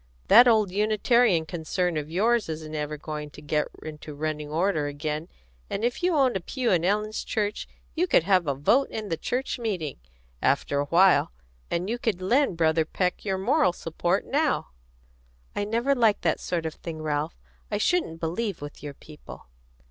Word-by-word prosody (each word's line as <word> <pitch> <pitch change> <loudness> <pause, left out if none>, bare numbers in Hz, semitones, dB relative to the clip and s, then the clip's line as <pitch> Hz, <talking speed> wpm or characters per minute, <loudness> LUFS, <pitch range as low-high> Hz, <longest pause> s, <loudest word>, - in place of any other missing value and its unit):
That 240 +2 +9
old 215 -5 +4
Unitarian 215 -2 +3
concern 175 +1 -2
of 150 0 -3
yours 215 +4 +1
isn't 155 -1 -5
ever 150 0 -3
going 150 0 -6
to 150 - -13
get 150 0 -1 0.2
into 150 -1 -8
running 150 0 -3
order 160 -1 0
again, 150 +2 -4 0.4
and 200 - -3
if 240 +6 -1
you 355 -1 +2
owned 265 -5 +3
a - - +1
pew 245 +7 -2
in 175 -3 +2
Ellen's 210 +3 0
church 210 -2 -2 0.3
you 350 +3 +1
could 175 - +4
have 185 -2 +3
a 140 - +1
vote 235 - +2
in 210 -6 -3
church 255 +1 -2
meeting, 185 - -3 0.4
after 140 - +1
a 145 - 0
while, 180 - +4 0.4
and 175 +2 -1
you 235 +3 -2
could 215 -7 -1
lend 230 +1 +2
Brother 160 -1 +3
Peck 180 +3 -2
your 195 -2 -1
moral 230 - +2
support 175 +3 -1
now." 295 +3 0 0.9
"I 205 - -1
never 235 +6 +1
liked 230 -5 +2
that 165 -3 +1
sort 170 -2 -2
of 160 - -3
thing, 160 -2 -7
Ralph. 150 +1 -2 0.3
I 205 - -1
shouldn't 210 - 0
believe 180 +5 -2
with 145 0 -9
your 145 -2 -7
people." 140 - -13
180 Hz, 180 wpm, -26 LUFS, 155-220 Hz, 0.9 s, That